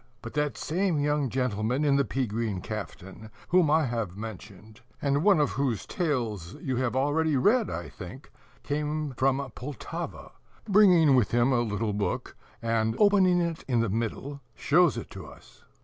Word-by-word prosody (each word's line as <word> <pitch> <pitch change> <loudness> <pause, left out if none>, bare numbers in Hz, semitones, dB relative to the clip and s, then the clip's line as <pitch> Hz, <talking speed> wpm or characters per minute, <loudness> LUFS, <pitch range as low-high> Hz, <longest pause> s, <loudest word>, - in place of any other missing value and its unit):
But 115 - -7
that 150 -1 -1
same 180 0 0
young 145 -1 0
gentleman 125 +2 -1
in 140 -1 +3
the 140 - +3
pea 135 -1 -1
green 110 -3 -2
caftan, 110 0 -7 0.2
whom 175 -3 +4
I 155 0 +3
have 115 -7 -3
mentioned, 105 0 -10 0.2
and 140 +1 0
one 200 -4 +5
of 145 - +2
whose 130 -6 -1
Tales 115 - -2
you 130 -2 -2
have 130 -1 -1
already 145 +2 +1
read, 220 - +3
I 85 - -5
think, 120 +10 -11 0.3
came 150 0 -2
from 135 +1 0
Poltava, 135 -1 -7 0.4
bringing 180 -8 +6
with 120 -6 +3
him 120 +2 +2
a 120 - +2
little 105 -1 -2
book, 100 -3 -3 0.3
and, 110 -1 0
opening 190 -4 +4
it 170 -2 -3
in 120 -3 +2
the 115 - 0
middle, 115 +7 -3
shows 165 -2 +3
it 115 - -7
to 95 -5 -9
us. - - -17
130 Hz, 165 wpm, -27 LUFS, 110-150 Hz, 0.4 s, bringing